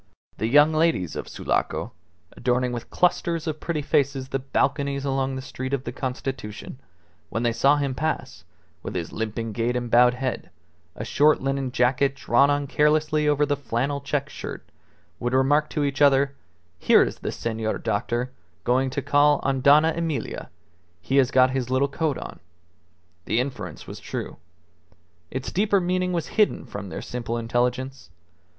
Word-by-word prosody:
The 110 Hz, -, 0 dB
young 145 Hz, +5 st, +5 dB
ladies 155 Hz, -, +1 dB
of -, -, -5 dB
Sulaco, -, -, -2 dB, 0.4 s
adorning 125 Hz, 0 st, 0 dB
with 120 Hz, -2 st, -6 dB
clusters 170 Hz, -2 st, +1 dB
of 155 Hz, -2 st, -3 dB
pretty 155 Hz, -3 st, -2 dB
faces 140 Hz, -2 st, 0 dB
the 135 Hz, -, -1 dB
balconies 140 Hz, +1 st, -1 dB
along 135 Hz, -1 st, 0 dB
the 130 Hz, -, -5 dB
Street 130 Hz, +1 st, -5 dB
of 130 Hz, -, -6 dB
the 120 Hz, -, -4 dB
Constitution, 130 Hz, -2 st, -5 dB, 0.5 s
when 115 Hz, -, -2 dB
they 120 Hz, -1 st, +2 dB
saw 140 Hz, +5 st, +4 dB
him 140 Hz, -2 st, -1 dB
pass, 155 Hz, -, -3 dB, 0.4 s
with -, -, -6 dB
his 85 Hz, -2 st, -3 dB
limping 110 Hz, 0 st, -3 dB
gait 115 Hz, +3 st, -1 dB
and 120 Hz, -1 st, -3 dB
bowed 125 Hz, +1 st, +6 dB
head, 130 Hz, -1 st, -3 dB, 0.5 s
a 110 Hz, -, -5 dB
short 150 Hz, +5 st, +4 dB
linen 135 Hz, -1 st, -2 dB
jacket 130 Hz, +3 st, +2 dB
drawn 140 Hz, 0 st, +3 dB
on 145 Hz, 0 st, +1 dB
carelessly 150 Hz, +1 st, +2 dB
over 150 Hz, 0 st, +3 dB
the 145 Hz, 0 st, 0 dB
flannel 140 Hz, +1 st, -2 dB
check 140 Hz, 0 st, -1 dB
shirt, -, -, -8 dB, 0.5 s
would 120 Hz, +1 st, -1 dB
remark 145 Hz, +3 st, +3 dB
to 150 Hz, -, -1 dB
each 140 Hz, 0 st, -2 dB
other, 140 Hz, -1 st, +5 dB, 0.5 s
"Here -, -, +6 dB
is -, -, -4 dB
the -, -, -3 dB
Senor 110 Hz, -1 st, -2 dB
doctor 120 Hz, +4 st, -2 dB, 0.3 s
going 130 Hz, +4 st, +2 dB
to 135 Hz, +1 st, -3 dB
call 145 Hz, 0 st, +4 dB
on 135 Hz, -1 st, 0 dB
Dona 150 Hz, +4 st, +6 dB
Emilia. 165 Hz, -3 st, -3 dB, 0.5 s
He 110 Hz, +11 st, -1 dB
has 130 Hz, -3 st, +5 dB
got 130 Hz, 0 st, +4 dB
his 130 Hz, -2 st, -2 dB
little 130 Hz, +2 st, +2 dB
coat 150 Hz, -1 st, -1 dB
on." -, -, -8 dB, 0.9 s
The 110 Hz, -, +1 dB
inference 130 Hz, +1 st, -4 dB
was -, -, -8 dB
true. -, -, -6 dB, 0.9 s
Its 130 Hz, 0 st, -4 dB
deeper 200 Hz, +1 st, +2 dB
meaning 180 Hz, 0 st, 0 dB
was 170 Hz, -3 st, -2 dB
hidden 210 Hz, -, +3 dB
from 100 Hz, -1 st, -7 dB
their -, -, -6 dB
simple 120 Hz, -1 st, -4 dB
intelligence. 125 Hz, 0 st, -1 dB
135 Hz, 165 wpm, -24 LUFS, 125-145 Hz, 0.9 s, bowed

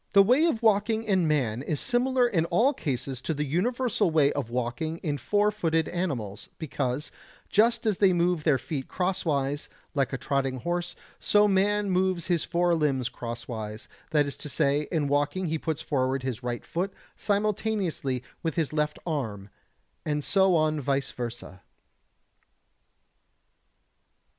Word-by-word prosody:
118. 200 Hz, -1 st, +8 dB
The -, -, -3 dB
way 295 Hz, +8 st, +5 dB
of 230 Hz, -3 st, -6 dB
walking 220 Hz, +1 st, +3 dB
in 190 Hz, -6 st, +2 dB
man 130 Hz, -7 st, +1 dB
is 145 Hz, +1 st, -2 dB
similar 250 Hz, +1 st, +2 dB
in 165 Hz, -8 st, +1 dB
all 255 Hz, +11 st, +3 dB
cases 135 Hz, -, -3 dB
to 160 Hz, -, -2 dB
the 150 Hz, -, -1 dB
universal 225 Hz, -, +1 dB
way 150 Hz, -3 st, +4 dB
of 140 Hz, -5 st, -3 dB
walking 125 Hz, +7 st, -2 dB
in 145 Hz, -4 st, -1 dB
four 205 Hz, -, +2 dB
footed 165 Hz, -6 st, 0 dB
animals, 120 Hz, -, -3 dB
because, 135 Hz, -2 st, -3 dB, 0.4 s
just 230 Hz, +3 st, +3 dB
as 210 Hz, -4 st, +1 dB
they 195 Hz, -2 st, +5 dB
move 175 Hz, -2 st, +1 dB
their 150 Hz, -4 st, +4 dB
feet 135 Hz, -1 st, -5 dB
crosswise, 150 Hz, -6 st, -1 dB, 0.2 s
like 140 Hz, -3 st, +1 dB
a 135 Hz, -, -2 dB
trotting 135 Hz, -1 st, -1 dB
horse, 175 Hz, +1 st, -2 dB, 0.2 s
so 210 Hz, 0 st, +4 dB
man 205 Hz, +1 st, +2 dB
moves 185 Hz, -2 st, +1 dB
his 175 Hz, -3 st, +1 dB
four 175 Hz, 0 st, +1 dB
limbs 140 Hz, -6 st, +1 dB
crosswise, 115 Hz, -3 st, -6 dB, 0.2 s
that 150 Hz, -2 st, +3 dB
is 140 Hz, -, -6 dB
to 150 Hz, -, -7 dB
say, 145 Hz, +2 st, +1 dB
in 155 Hz, -5 st, +1 dB
walking 145 Hz, +6 st, 0 dB
he 160 Hz, 0 st, -1 dB
puts 160 Hz, -1 st, -3 dB
forward 130 Hz, -2 st, 0 dB
his 130 Hz, -3 st, -3 dB
right 120 Hz, -1 st, -4 dB
foot 180 Hz, +4 st, -2 dB, 0.2 s
simultaneously 200 Hz, -, -1 dB, 0.2 s
with 165 Hz, -2 st, -2 dB
his 160 Hz, -3 st, -1 dB
left 150 Hz, -1 st, 0 dB
arm, 110 Hz, -, -3 dB, 0.5 s
and 150 Hz, -1 st, -1 dB
so 190 Hz, +1 st, +4 dB
on 155 Hz, -1 st, +2 dB
vice 140 Hz, 0 st, -1 dB
versa. 120 Hz, -6 st, -7 dB
155 Hz, 155 wpm, -27 LUFS, 135-190 Hz, 0.5 s, 118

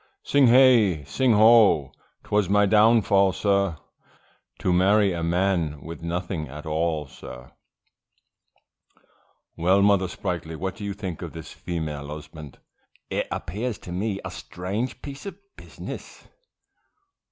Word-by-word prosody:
Sing 140 Hz, -2 st, +4 dB
hey! 115 Hz, -, +5 dB
sing 115 Hz, -, +1 dB
O! 110 Hz, -, +5 dB, 0.3 s
'twas 105 Hz, -3 st, 0 dB
my 105 Hz, +1 st, +4 dB
downfall, 105 Hz, -2 st, +4 dB
sir, 100 Hz, -3 st, 0 dB, 0.8 s
To 90 Hz, -, 0 dB
marry 100 Hz, +2 st, +3 dB
a 85 Hz, -, -4 dB
man 85 Hz, -3 st, 0 dB
with 80 Hz, +1 st, -8 dB
nothing 85 Hz, -1 st, -4 dB
at 75 Hz, +3 st, -10 dB
all, 80 Hz, -1 st, -1 dB
sir, 60 Hz, -2 st, -12 dB, 2.0 s
Well 95 Hz, +4 st, +3 dB
Mother 100 Hz, -2 st, +3 dB
Sprightly, 85 Hz, -3 st, -5 dB
what 95 Hz, +3 st, -4 dB
do 105 Hz, -, -7 dB
you 100 Hz, -, -3 dB
think 95 Hz, -5 st, -6 dB
of -, -, -7 dB
this 80 Hz, -1 st, -9 dB
Female 75 Hz, -4 st, -5 dB
Husband; 75 Hz, -1 st, -10 dB, 0.5 s
it -, -, -1 dB
appears 110 Hz, +6 st, -4 dB
to 90 Hz, -, -11 dB
me 100 Hz, +2 st, -2 dB
a -, -, -5 dB
strange 100 Hz, +8 st, -5 dB
piece 140 Hz, +6 st, -8 dB
of 200 Hz, -, -7 dB, 0.2 s
business. -, -, -10 dB
95 Hz, 130 wpm, -24 LUFS, 80-105 Hz, 2.0 s, hey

